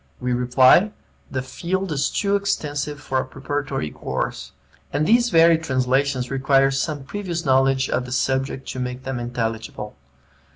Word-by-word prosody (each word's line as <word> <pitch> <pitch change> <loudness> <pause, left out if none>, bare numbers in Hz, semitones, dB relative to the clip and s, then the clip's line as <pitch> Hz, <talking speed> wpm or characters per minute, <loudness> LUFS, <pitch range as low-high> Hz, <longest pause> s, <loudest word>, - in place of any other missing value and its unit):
We 125 0 -1
reply, 130 - +5 0.4
the 130 -1 -3
field 185 +7 -3
is 140 -1 +1
too 200 0 0
extensive 150 -7 -2
for 130 -2 -1
a - - 0
preparatory 135 - -3
course; - - -4 0.4
and 145 +2 0
these 235 +4 +4
very 165 -3 +5
translations 130 -2 0
require 135 0 +3
some 140 +1 -2
previous 170 +1 -4
knowledge 135 0 +3
of 125 - -1
the 125 - -9
subject 130 +1 -1
to 130 - -5
make 125 0 -4
them 130 -2 -3
intelligible. 115 -3 -4
135 Hz, 150 wpm, -22 LUFS, 130-155 Hz, 0.4 s, reply